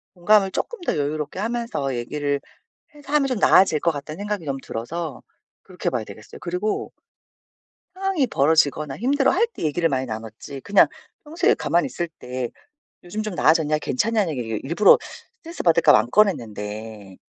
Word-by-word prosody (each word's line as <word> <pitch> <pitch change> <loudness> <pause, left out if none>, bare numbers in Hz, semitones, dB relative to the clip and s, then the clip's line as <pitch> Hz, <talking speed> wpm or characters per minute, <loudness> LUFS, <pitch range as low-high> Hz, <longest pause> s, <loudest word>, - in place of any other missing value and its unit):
공감을 195 +2 +4
쪼끔 475 - -4
더 345 - -1
여유롭게 150 +2 -3
하면서 225 - -2
얘기를 145 +3 -2 0.5
해서 290 -1 -13
하면 290 -2 +4
좀 250 -4 -1
나아질 185 -6 +5
것 170 - +2
같다는 150 +2 -7
생각이 205 -3 -3
너무 135 -2 -3
들어서 150 +5 -5 0.4
그렇게 185 -1 -10
해봐야 120 -4 0
되겠어요. 105 +1 -12
그리고 180 +5 -2 1.0
상황이 380 -8 0
벌어지거나 145 - +2
힘들어할 285 - +2
때 - - -7
얘기를 165 +2 +1
많이 130 -2 -1
나눴지. 110 +4 -7
그냥 200 +6 +5 0.4
평소에 310 +3 +2
가만히 175 +1 +1
있을 170 -1 -4
때 125 -1 -4 0.6
"요즘 210 +5 -4
좀 210 -4 -4
나아졌냐? 155 -1 +3
괜찮냐?"는 210 - 0
얘기를 115 -3 -3
일부러 170 +8 +6 0.4
스트레스 335 -3 -7
받을까 170 -1 +5
봐 - - +7
안 120 +3 -3
꺼냈는데 110 - -1
160 Hz, 385 characters per minute, -23 LUFS, 130-210 Hz, 1.0 s, 봐